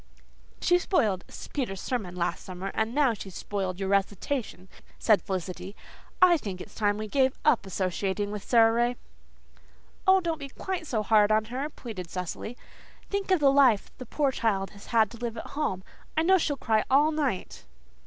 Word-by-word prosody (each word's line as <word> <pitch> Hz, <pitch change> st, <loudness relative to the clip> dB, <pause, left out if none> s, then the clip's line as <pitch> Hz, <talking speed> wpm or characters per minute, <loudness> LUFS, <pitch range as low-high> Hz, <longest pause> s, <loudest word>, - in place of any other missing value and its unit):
"She 355 Hz, 0 st, +4 dB
spoiled 215 Hz, -, +1 dB, 0.3 s
Peter's 235 Hz, -10 st, -2 dB
sermon 200 Hz, -8 st, -3 dB
last 175 Hz, -1 st, -2 dB
summer 185 Hz, +1 st, -6 dB
and 220 Hz, +3 st, -1 dB
now 285 Hz, -5 st, +4 dB
she's 195 Hz, -3 st, -9 dB
spoiled 190 Hz, -3 st, -3 dB
your 195 Hz, -1 st, -2 dB
recitation," 200 Hz, +1 st, -1 dB, 0.3 s
said 215 Hz, -3 st, +4 dB
Felicity. 185 Hz, +1 st, -5 dB, 0.5 s
"I 350 Hz, -2 st, +7 dB
think 195 Hz, -10 st, -6 dB
it's -, -, -10 dB
time 205 Hz, -1 st, +1 dB
we 215 Hz, 0 st, -4 dB
gave 265 Hz, +3 st, +2 dB
up 205 Hz, -5 st, +3 dB
associating 190 Hz, +2 st, -1 dB
with 210 Hz, -1 st, -5 dB
Sara 225 Hz, -2 st, +5 dB
Ray." 240 Hz, +2 st, +1 dB, 1.1 s
"Oh, 380 Hz, 0 st, +7 dB
don't 335 Hz, -3 st, -2 dB
be 280 Hz, -1 st, -7 dB
quite 360 Hz, +3 st, -4 dB
so 220 Hz, -6 st, -1 dB
hard 210 Hz, 0 st, +4 dB
on 215 Hz, 0 st, +3 dB
her," 275 Hz, +4 st, -2 dB
pleaded 210 Hz, -, -8 dB
Cecily. 185 Hz, +7 st, -5 dB, 0.5 s
"Think 400 Hz, -1 st, -2 dB
of 370 Hz, -2 st, +4 dB
the 280 Hz, -2 st, +5 dB
life 265 Hz, -7 st, +4 dB
the 255 Hz, -, -8 dB
poor 285 Hz, +1 st, +1 dB
child 205 Hz, -6 st, 0 dB
has 200 Hz, -, -14 dB, 0.2 s
to 235 Hz, -, -11 dB
live 235 Hz, -1 st, -4 dB
at -, -, -6 dB
home. 190 Hz, -11 st, -2 dB, 0.3 s
I 320 Hz, -, +4 dB
know 380 Hz, +2 st, +5 dB
she'll 290 Hz, -3 st, -1 dB
cry 220 Hz, -4 st, +1 dB
all 290 Hz, +4 st, +5 dB
night." 285 Hz, -11 st, -3 dB
220 Hz, 175 wpm, -27 LUFS, 195-275 Hz, 1.1 s, I